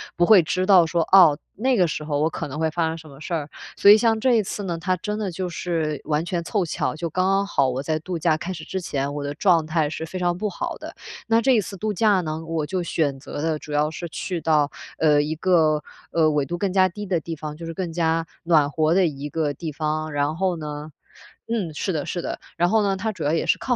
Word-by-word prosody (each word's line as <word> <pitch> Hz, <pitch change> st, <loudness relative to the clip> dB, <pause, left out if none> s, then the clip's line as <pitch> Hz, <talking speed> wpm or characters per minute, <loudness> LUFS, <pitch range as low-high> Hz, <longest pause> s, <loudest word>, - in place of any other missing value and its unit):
不 175 Hz, -, +3 dB
会 190 Hz, -3 st, +7 dB
知 185 Hz, +3 st, -1 dB
道 185 Hz, -4 st, +6 dB
说， 170 Hz, +1 st, 0 dB
哦， 175 Hz, -6 st, +7 dB, 0.2 s
那 255 Hz, +3 st, +1 dB
个 180 Hz, -2 st, +4 dB
时 150 Hz, -, -4 dB
候 145 Hz, -1 st, -1 dB
我 160 Hz, -, +2 dB
可 165 Hz, -, -5 dB
能 150 Hz, +4 st, -6 dB
会 160 Hz, -, +1 dB
发 165 Hz, 0 st, 0 dB
生 160 Hz, -, -3 dB
什 160 Hz, -2 st, -12 dB
么 135 Hz, -, -14 dB
事 170 Hz, -, -5 dB
儿。 150 Hz, -3 st, -2 dB, 0.3 s
所 200 Hz, -, +6 dB
以 210 Hz, -, +10 dB
像 225 Hz, -1 st, +2 dB
这 255 Hz, +2 st, +3 dB
一 220 Hz, -3 st, +3 dB
次 205 Hz, +2 st, -5 dB
呢， 170 Hz, -3 st, -3 dB
它 185 Hz, +2 st, 0 dB
真 210 Hz, +4 st, -4 dB
的 200 Hz, -4 st, -2 dB
就 180 Hz, +1 st, -4 dB
是 160 Hz, -4 st, -2 dB
完 155 Hz, +1 st, 0 dB
全 175 Hz, -1 st, -2 dB
凑 195 Hz, 0 st, 0 dB
巧， 155 Hz, -, -2 dB
就 170 Hz, +1 st, -4 dB
刚 185 Hz, +4 st, 0 dB
刚 195 Hz, +1 st, +2 dB
好 140 Hz, -9 st, +2 dB
我 130 Hz, +1 st, -2 dB
在 155 Hz, +2 st, -1 dB
度 175 Hz, +1 st, -5 dB
假 160 Hz, -1 st, +2 dB
开 180 Hz, +4 st, -5 dB
始 160 Hz, -2 st, -8 dB
之 190 Hz, -, -4 dB
前， 140 Hz, -3 st, -2 dB
我 145 Hz, -, -3 dB
的 145 Hz, -, -3 dB
状 165 Hz, 0 st, +3 dB
态 155 Hz, -2 st, 0 dB
是 160 Hz, +1 st, -5 dB
非 185 Hz, +3 st, -6 dB
常 175 Hz, -1 st, 0 dB
不 210 Hz, +1 st, -2 dB
好 -, -, -4 dB
的。 -, -, -9 dB, 0.3 s
那 225 Hz, 0 st, +3 dB
这 265 Hz, +3 st, +3 dB
一 220 Hz, -, +3 dB
次 195 Hz, 0 st, -8 dB
度 215 Hz, +2 st, -2 dB
假 205 Hz, 0 st, +3 dB
呢， 160 Hz, 0 st, -4 dB
我 160 Hz, -2 st, -2 dB
就 185 Hz, +2 st, -2 dB
选 145 Hz, -4 st, -1 dB
择 145 Hz, +1 st, -6 dB
的 160 Hz, -1 st, 0 dB
主 150 Hz, -, -10 dB
要 150 Hz, +1 st, +2 dB
是 170 Hz, +1 st, -6 dB
去 175 Hz, +2 st, -4 dB
到， 150 Hz, -3 st, +2 dB, 0.3 s
呃， 150 Hz, -2 st, +4 dB
一 150 Hz, +2 st, -2 dB
个， 160 Hz, -3 st, +3 dB, 0.3 s
呃， 160 Hz, -2 st, +3 dB
纬 150 Hz, -2 st, +1 dB
度 175 Hz, -, -4 dB
更 190 Hz, 0 st, -1 dB
加 185 Hz, -1 st, +4 dB
低 205 Hz, +3 st, -7 dB
的 185 Hz, -3 st, 0 dB
地 165 Hz, +1 st, -5 dB
方， 150 Hz, 0 st, -6 dB
就 165 Hz, +1 st, -8 dB
是 165 Hz, -, -5 dB
更 170 Hz, -1 st, -4 dB
加 165 Hz, -1 st, +1 dB, 0.2 s
暖 155 Hz, -4 st, +4 dB
和 155 Hz, +2 st, +1 dB
的 185 Hz, -1 st, +4 dB
一 145 Hz, -1 st, -5 dB
个 150 Hz, -1 st, -1 dB
地 155 Hz, +2 st, -5 dB
方， 155 Hz, +1 st, -2 dB
然 145 Hz, +1 st, 0 dB
后 185 Hz, 0 st, 0 dB
呢 150 Hz, 0 st, -6 dB, 0.6 s
嗯， 210 Hz, -9 st, -2 dB
是 185 Hz, +4 st, -2 dB
的 150 Hz, -, -2 dB
是 175 Hz, -, -3 dB
的， -, -, -4 dB, 0.2 s
然 175 Hz, +1 st, +3 dB
后 220 Hz, +2 st, +3 dB
呢， 195 Hz, -1 st, 0 dB
它 220 Hz, +3 st, -2 dB
主 185 Hz, -6 st, -7 dB
要 145 Hz, -, +1 dB
也 165 Hz, -, 0 dB
是 -, -, +3 dB
靠 250 Hz, -, 0 dB
165 Hz, 290 characters per minute, -23 LUFS, 155-185 Hz, 0.6 s, 以